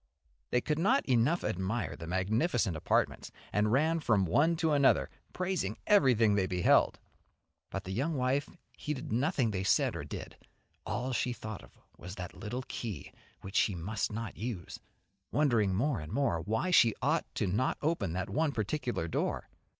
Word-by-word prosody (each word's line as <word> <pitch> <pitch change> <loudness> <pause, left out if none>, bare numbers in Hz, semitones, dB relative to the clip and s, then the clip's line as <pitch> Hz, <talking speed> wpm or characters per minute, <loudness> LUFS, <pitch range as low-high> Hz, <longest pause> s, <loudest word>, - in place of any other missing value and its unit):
They 125 - +2
could 150 +2 -1
not 255 +11 +3
enough 130 +7 +2
admire 95 +4 -2
the 80 - -8
magnificent 95 - +1
apartments, 80 - 0 0.2
and 105 +1 +2
ran 160 +6 +3
from 110 -10 +2
one 150 - +3
to 160 -1 +1
another 140 -2 +3 0.2
praising 180 - -2
everything 125 - +5
they 95 -2 +2
beheld. 90 -1 +3 0.7
But - - -4
the 95 - -6
young 140 +11 -1
wife 135 +2 0 0.3
heeded 150 -6 -5
nothing 130 0 +1
they 95 -2 -2
said - - +2
or - - -4
did, - - -8 0.5
all 125 +1 -2
she 125 +1 0
thought 110 -4 -7
of - - -18 0.2
was 90 +2 -8
that 90 -3 -7
little 120 +4 -5
key 115 -5 -6 0.3
which 95 +1 -9
she 100 - +3
must 100 +7 -2
not 110 0 -5
use, 105 -7 -5 0.5
wondering 115 -8 +2
more 130 +3 +1
and 75 0 -8
more 135 -13 +1
why 110 - -1
she 115 -10 +5
ought - - +1
not 105 +8 0
to - - -5
open 115 - 0
that 95 +1 -2
one 155 0 0
particular 115 - -2
door. 80 - -2
115 Hz, 165 wpm, -31 LUFS, 95-145 Hz, 0.7 s, everything